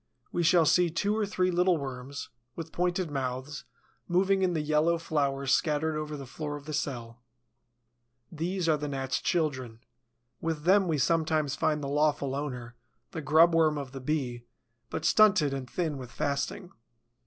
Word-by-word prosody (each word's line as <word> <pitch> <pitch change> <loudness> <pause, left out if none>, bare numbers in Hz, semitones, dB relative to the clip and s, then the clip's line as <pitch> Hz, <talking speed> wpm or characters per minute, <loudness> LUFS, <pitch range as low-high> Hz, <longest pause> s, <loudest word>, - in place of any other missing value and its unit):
We 175 - -1
shall 170 0 +5
see 175 +3 +4
two 200 +6 0
or 215 -2 0
three 185 -2 +1
little 180 0 +3
worms, 135 0 -6 0.3
with 165 -1 -7
pointed 180 -1 -1
mouths, 130 +1 -4 0.4
moving 190 +2 +2
in 185 -2 +2
the 160 - 0
yellow 155 +3 +2
flour 140 -4 -1
scattered 155 +2 +1
over 150 0 -4
the 140 - -7
floor 145 +3 -5
of 145 -1 -9
the 155 - -6
cell. 120 -5 -4 1.1
These 175 +3 -2
are 155 -2 +3
the 150 0 -4
Gnat's 135 -1 -2
children. 130 -9 -1 0.6
With 160 -2 -3
them 190 +2 +4
we 160 -3 +1
sometimes 155 0 +1
find 150 -1 0
the - - -2
lawful 145 -1 +1
owner, 125 -4 -4 0.4
the 160 - -5
grub 160 +3 +5
worm 160 -2 +3
of 140 -3 -5
the 135 0 -8
Bee, 130 -4 -2 0.5
but 160 - -4
stunted 185 -9 +5
and 130 -2 -5
thin 155 -4 -2
with 125 -2 -8
fasting. 145 +5 -3
150 Hz, 165 wpm, -29 LUFS, 140-170 Hz, 1.1 s, shall